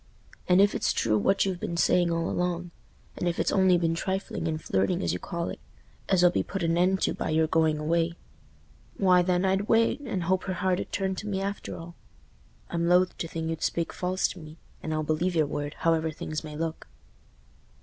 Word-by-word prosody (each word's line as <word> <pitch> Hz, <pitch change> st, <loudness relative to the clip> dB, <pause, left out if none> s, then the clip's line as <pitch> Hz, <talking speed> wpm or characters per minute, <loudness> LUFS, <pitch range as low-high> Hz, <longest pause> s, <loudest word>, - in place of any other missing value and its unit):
And 180 Hz, +1 st, +6 dB
if 200 Hz, +1 st, +5 dB
it's -, -, 0 dB
true 110 Hz, -2 st, +1 dB
what 195 Hz, -, +2 dB
you've 185 Hz, -2 st, -2 dB
been 170 Hz, -, -3 dB
saying 175 Hz, 0 st, +3 dB
all 165 Hz, 0 st, 0 dB
along—and 175 Hz, 0 st, -4 dB
if 170 Hz, -, -3 dB
it's -, -, +1 dB
only 190 Hz, -2 st, +4 dB
been 165 Hz, -1 st, +1 dB
trifling 190 Hz, 0 st, -3 dB
and 155 Hz, -1 st, -2 dB
flirting 95 Hz, -, 0 dB
as 85 Hz, -, 0 dB
you 90 Hz, -, -3 dB
call 170 Hz, -, -4 dB
it, -, -, -7 dB, 0.5 s
as 185 Hz, -2 st, +4 dB
'll 175 Hz, -, +6 dB
be -, -, +1 dB
put 195 Hz, -2 st, -4 dB
an 165 Hz, 0 st, +2 dB
end 185 Hz, +2 st, +2 dB
to -, -, +1 dB
by -, -, -3 dB
your 160 Hz, +1 st, +3 dB
going 160 Hz, -1 st, +2 dB
away—why, 170 Hz, +3 st, -1 dB
then, 180 Hz, +1 st, +1 dB
I'd 190 Hz, +2 st, 0 dB
wait, 230 Hz, +4 st, +3 dB
and 200 Hz, -11 st, -3 dB
hope 185 Hz, +2 st, 0 dB
her 185 Hz, -, -2 dB
heart 185 Hz, +1 st, 0 dB
'ud -, -, -6 dB
turn 190 Hz, -1 st, -1 dB
to 210 Hz, -, -5 dB
me 195 Hz, -2 st, -1 dB
after 200 Hz, +1 st, -4 dB
all. 170 Hz, +1 st, -9 dB, 0.8 s
I'm 170 Hz, 0 st, 0 dB
loath 180 Hz, +1 st, +3 dB
to 165 Hz, -, -2 dB
think 160 Hz, 0 st, -3 dB
you'd 160 Hz, -, -5 dB
speak 170 Hz, -1 st, -1 dB
false 185 Hz, +1 st, 0 dB
to 185 Hz, -, -8 dB
me, 155 Hz, 0 st, -11 dB, 0.2 s
and 160 Hz, -, -4 dB
I'll 155 Hz, 0 st, 0 dB
believe 160 Hz, +4 st, 0 dB
your 155 Hz, -2 st, +3 dB
word, 145 Hz, +1 st, -4 dB
however 165 Hz, -1 st, +1 dB
things 155 Hz, 0 st, -5 dB
may 150 Hz, -1 st, -8 dB
look." 160 Hz, +1 st, -4 dB
170 Hz, 210 wpm, -27 LUFS, 160-185 Hz, 0.8 s, And